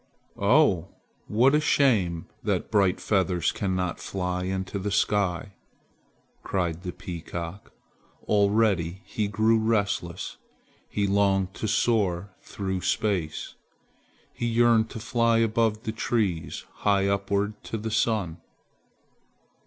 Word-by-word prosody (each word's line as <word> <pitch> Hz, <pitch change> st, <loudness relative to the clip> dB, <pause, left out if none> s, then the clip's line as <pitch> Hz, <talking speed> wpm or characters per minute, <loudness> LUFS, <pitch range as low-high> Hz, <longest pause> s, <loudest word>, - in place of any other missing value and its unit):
"Oh, 100 Hz, -, +4 dB, 0.4 s
what 125 Hz, +6 st, +4 dB
a 150 Hz, -, +5 dB
shame 100 Hz, -, +2 dB, 0.2 s
that -, -, -1 dB
bright 95 Hz, -3 st, +3 dB
feathers 95 Hz, -4 st, +1 dB
cannot 95 Hz, -3 st, -2 dB
fly 90 Hz, -1 st, -3 dB
into 95 Hz, +1 st, -3 dB
the 100 Hz, +2 st, -2 dB
sky!" 100 Hz, -1 st, 0 dB, 0.9 s
cried 85 Hz, -3 st, -2 dB
the 90 Hz, -1 st, -4 dB
peacock. 85 Hz, +2 st, -7 dB, 0.6 s
Already 100 Hz, -4 st, +2 dB
he 105 Hz, -2 st, -2 dB
grew 110 Hz, +2 st, +3 dB
restless. 100 Hz, -6 st, -1 dB, 0.5 s
He 100 Hz, -, 0 dB
longed 95 Hz, -1 st, +2 dB
to 110 Hz, -, -4 dB
soar 100 Hz, -4 st, +1 dB
through 95 Hz, -2 st, -4 dB
space. 95 Hz, -4 st, -1 dB, 0.8 s
He 120 Hz, -, -2 dB
yearned 115 Hz, -1 st, +3 dB
to -, -, -7 dB
fly 115 Hz, 0 st, +2 dB
above 110 Hz, -1 st, +1 dB
the 110 Hz, -, -2 dB
trees 105 Hz, -7 st, -1 dB
high 100 Hz, -1 st, +2 dB
upward 100 Hz, +1 st, -1 dB
to 115 Hz, -, -3 dB
the 110 Hz, +1 st, -4 dB
sun. 105 Hz, -7 st, 0 dB
100 Hz, 115 wpm, -26 LUFS, 90-110 Hz, 0.9 s, a